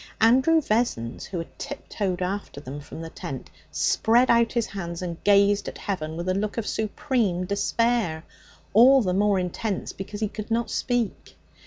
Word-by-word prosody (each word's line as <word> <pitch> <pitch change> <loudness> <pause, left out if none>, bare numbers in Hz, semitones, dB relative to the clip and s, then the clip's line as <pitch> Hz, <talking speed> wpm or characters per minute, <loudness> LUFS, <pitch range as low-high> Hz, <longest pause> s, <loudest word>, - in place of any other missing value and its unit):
Andrew 260 +9 +5
Vessons, 215 - -1
who 190 - -5
had 165 - -7
tiptoed 185 -3 -3
after 190 -5 -4
them 140 0 -7
from 145 +2 -9
the 165 0 -7
tent, 135 -2 -7 0.2
spread 240 +3 +3
out 235 -1 +4
his 235 -3 +1
hands 170 -3 -5
and 170 -2 -6
gazed 200 0 +4
at - - -6
heaven 160 -5 -4
with 170 +1 -4
a 185 - +2
look 205 +3 -2
of 230 - -1
supreme 215 -5 -1
despair, 200 -3 0 0.5
all 255 +4 +7
the 180 -2 0
more 205 +1 +3
intense 185 +3 -3
because 205 +2 -7
he 215 - 0
could 215 +1 -7
not 230 +1 0
speak. 245 -4 -2
200 Hz, 170 wpm, -25 LUFS, 180-230 Hz, 0.5 s, all